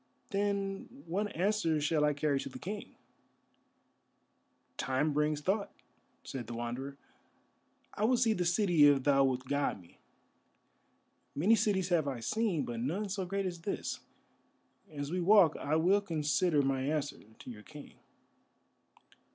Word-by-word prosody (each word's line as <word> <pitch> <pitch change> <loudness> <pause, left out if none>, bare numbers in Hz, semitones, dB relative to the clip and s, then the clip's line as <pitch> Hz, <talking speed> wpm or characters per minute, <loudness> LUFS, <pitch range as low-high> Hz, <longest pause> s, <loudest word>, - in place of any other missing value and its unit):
"Then, 200 +4 -2
what 200 +5 -2
answer 175 -3 +1
shall 150 0 +1
I 150 - +2
carry 145 -1 0
to - - -5
the 130 - -9
King?" 200 +9 -7 1.8
"Time 135 +4 0
brings 150 0 0
thought," 200 +5 -1 0.5
said 125 -4 -6
the 120 - -6
Wanderer; 125 +4 -5 1.0
"I 210 - 0
would 250 +2 +3
see 230 -2 +3
the 180 - -1
city 175 -3 +3
if 140 -2 +4
thou 140 -1 +4
wilt 130 -1 0
guide 140 -5 -1
me. 85 -2 -20 1.4
Many 185 +10 +4
cities 195 -4 +1
have 165 -5 +2
I 130 -4 -3
seen, 195 - -1
but 120 -1 -5
none 180 - -2
so 190 -1 -3
great 195 +1 -2
as 175 -2 -4
this. 195 - -3 0.9
As 145 -1 -5
we 180 +1 -1
walk 185 -3 +6
I 150 +2 -1
will 185 +6 +3
consider 155 -3 +1
my 135 -1 0
answer 145 +1 -2 0.2
to - - -11
your 105 -3 -10
King." 150 +5 -12
160 Hz, 145 wpm, -32 LUFS, 140-195 Hz, 1.8 s, walk